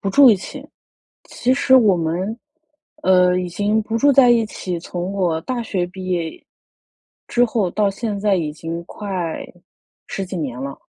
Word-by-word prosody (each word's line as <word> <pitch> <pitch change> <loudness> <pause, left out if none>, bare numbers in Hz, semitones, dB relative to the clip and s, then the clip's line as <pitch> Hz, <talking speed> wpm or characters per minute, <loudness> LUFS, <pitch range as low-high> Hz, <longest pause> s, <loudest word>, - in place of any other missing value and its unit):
不 200 - -2
住 265 +6 +7
一 210 - +4
起， 190 - -9 0.6
其 250 - -1
实 260 -1 +4
我 215 -7 +5
们， 175 +7 -2 0.6
呃， 180 -3 +4
已 180 - -3
经 205 +5 0
不 225 +1 -2
住 280 +4 +4
在 255 -2 +6
一 230 -2 +4
起 180 -4 -5
从 175 +2 -5
我 175 -5 0
大 250 +3 -3
学 185 -5 -1
毕 185 +1 -9
业， 170 -3 -3 0.8
之 245 - +2
后 220 -5 0
到 205 +1 +1
现 205 +1 -4
在 205 -1 +2
已 155 -4 -2
经 165 +2 -6
快 185 -5 -4 0.6
10 195 - -4
几 185 0 -6
年 130 -5 -4
了。 140 0 -5
190 Hz, 180 characters per minute, -20 LUFS, 175-220 Hz, 0.8 s, 住